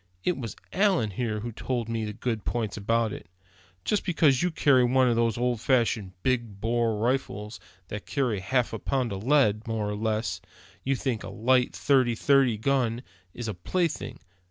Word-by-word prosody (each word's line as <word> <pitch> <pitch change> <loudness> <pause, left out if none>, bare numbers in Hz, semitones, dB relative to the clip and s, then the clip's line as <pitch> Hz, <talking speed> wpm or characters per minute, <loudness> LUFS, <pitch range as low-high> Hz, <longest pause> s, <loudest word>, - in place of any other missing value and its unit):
It 180 - +1
was 115 -5 -6 0.2
Allan 185 - +2
here 110 0 -2
who 120 +2 -4
told 120 0 -3
me 115 -1 -2
the 105 - -4
good 115 -1 -3
points 115 -4 -2
about 110 +1 0
it. - - -9 0.6
Just 210 - +1
because 155 -7 +3
you 180 - +2
carry 140 -6 +4
one 130 +1 +4
of 120 - +2
those 115 -1 +1
old 120 -2 0
fashioned, 115 -7 +1
big 120 -6 -1
bore 115 0 +1
rifles, 110 -2 -2 0.3
that 105 -1 -6
carry 125 -8 0
half 120 +6 0
a 110 - -3
pound 125 -4 -1
of 95 +1 -5
lead, 120 -6 +3
more 110 -2 -1
or 105 - -2
less, 110 -4 -1 0.4
you 135 +1 +1
think 120 -3 -2
a - - -6
light 125 +2 +2
thirty 130 -4 +3
thirty 135 -2 +3
gun 120 0 0 0.3
is 120 -2 -5
a 110 - -2
plaything. 135 - -2
120 Hz, 180 wpm, -27 LUFS, 110-130 Hz, 0.6 s, carry